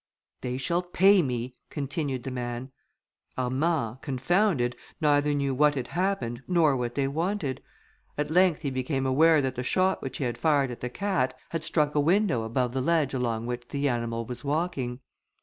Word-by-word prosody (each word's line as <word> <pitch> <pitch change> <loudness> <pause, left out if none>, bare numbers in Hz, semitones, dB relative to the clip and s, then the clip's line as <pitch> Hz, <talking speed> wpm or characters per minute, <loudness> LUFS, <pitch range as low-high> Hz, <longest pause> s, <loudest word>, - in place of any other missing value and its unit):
"They 125 0 -3
shall 170 +7 0
pay 190 +2 +5
me," 125 -3 -3 0.2
continued 140 -3 -3
the 135 - -4
man. 120 +1 -4 0.7
Armand, 130 -1 0
confounded, 140 - +1 0.2
neither 145 -1 +3
knew 140 -1 0
what 145 +2 +3
had 125 -3 -3
happened, 170 -11 -1
nor 165 -6 +3
what 120 -1 -3
they 140 -1 +1
wanted. 160 -1 -2 0.6
At 150 +1 -1
length 180 -2 +4
he 140 -3 -2
became 130 +1 -1
aware 150 +3 +4
that 130 -1 -1
the 125 - -4
shot 185 +9 +1
which 130 -2 -5
he - - -2
had 120 -2 -2
fired 145 -5 +2
at 120 - -7
the 125 - -4
cat, 130 -6 -1
had 165 -1 -3
struck 150 -2 +1
a 150 - +2
window 170 - +2
above 120 +2 -1
the 130 - 0
ledge 155 -1 +1
along 115 -3 -1
which 120 0 -4
the 140 +2 -1
animal 115 -2 -1
was 125 +2 -6
walking. 140 -5 -2
135 Hz, 180 wpm, -27 LUFS, 125-160 Hz, 0.7 s, pay